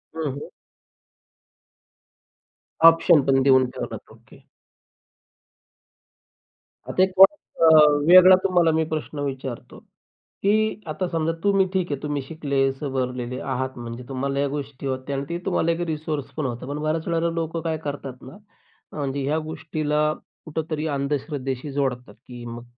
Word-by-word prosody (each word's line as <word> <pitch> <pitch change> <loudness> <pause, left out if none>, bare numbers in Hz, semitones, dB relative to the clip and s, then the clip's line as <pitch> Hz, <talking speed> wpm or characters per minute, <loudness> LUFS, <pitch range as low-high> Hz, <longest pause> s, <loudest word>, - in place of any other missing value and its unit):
हं, 160 -3 -2
हं. 140 - -7 2.4
ऑप्शन 165 -2 +6
पण 135 -1 +3
देऊन 130 -1 +5
ठेवलंत. - - -7
ओके. - - -18 2.5
आता 185 - +3
एक 190 - +1
अ, 195 -4 +5 0.4
वेगळा 185 +1 +9
तुम्हाला 175 -3 +3
मी 160 0 +1
प्रश्न 155 -1 -4
विचारतो. 135 -3 -5 0.6
की 215 +2 +1
आता 180 +4 -2
समजा 165 -1 0
तुम्ही 200 -1 +3
ठीक 185 -4 -1
आहे 140 - -3
तुम्ही 145 -1 -2
शिकले, 140 -2 -1
सवरलेले 130 -2 -4
आहात. 130 0 -3
म्हणजे 120 +1 -7
तुम्हाला 135 +1 -2
या 140 - +1
गोष्टी 140 -1 -5
होत्या 130 +1 -3
आणि 140 - -3
ते 170 - -2
तुम्हाला 170 -3 +1
एक 165 - -2
रिसोर्स 155 -2 -3
पण 155 - -1
होता. 120 -1 -4
पण 145 +2 -4
बऱ्याच 155 +1 -2
वेळेला 170 0 0
लोकं 165 0 -3
काय 160 -1 -2
करतात 140 -3 -6
ना, 130 +10 -12 0.6
म्हणजे 140 -1 -2
ह्या 150 +3 0
गोष्टीला 155 -1 -1 0.3
कुठेतरी 155 0 -3
अंधश्रद्धेशी 140 -1 -3
जोडतात. 130 -5 -2
की 120 +1 -12
मग 120 0 -7
145 Hz, 135 wpm, -23 LUFS, 135-165 Hz, 2.5 s, वेगळा